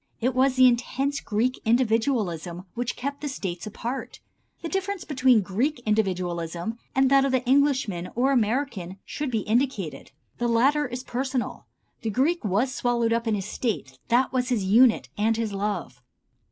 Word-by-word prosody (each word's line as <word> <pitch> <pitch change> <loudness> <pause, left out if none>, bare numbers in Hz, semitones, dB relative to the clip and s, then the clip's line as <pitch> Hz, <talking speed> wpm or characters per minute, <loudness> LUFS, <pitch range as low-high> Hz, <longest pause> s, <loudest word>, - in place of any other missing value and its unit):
It 255 +3 +1
was 260 +1 +3
the 255 0 +6
intense 265 +3 +1
Greek 235 +4 -1
individualism 220 - 0
which 245 0 -3
kept 280 +2 -4
the 295 - -3
States 185 -8 -5
apart. 235 +5 -5 0.4
The - - -2
difference 385 +1 -2
between 255 -5 +3
Greek 240 +10 -1
individualism 180 -1 -1 0.2
and 265 0 +3
that 275 0 +6
of 275 - +1
the 260 -1 +1
Englishman 260 -9 +2
or 260 +4 +2
American 225 -6 0
should 295 -2 -4
be 225 -3 0
indicated. 210 - -1 0.3
The 240 - +1
latter 275 +6 +3
is 250 +1 -6
personal. 260 0 -3 0.3
The 225 - -2
Greek 280 - +1
was 215 +6 +1
swallowed 235 -2 +1
up 230 0 -1
in 220 - +2
his 195 -2 -3
State, 195 - -3
that 250 +3 +2
was 255 0 0
his 235 -6 +1
unit 225 +5 +4
and 220 +1 +2
his 225 -3 -2
love. 200 -11 -3
240 Hz, 165 wpm, -25 LUFS, 210-265 Hz, 0.4 s, the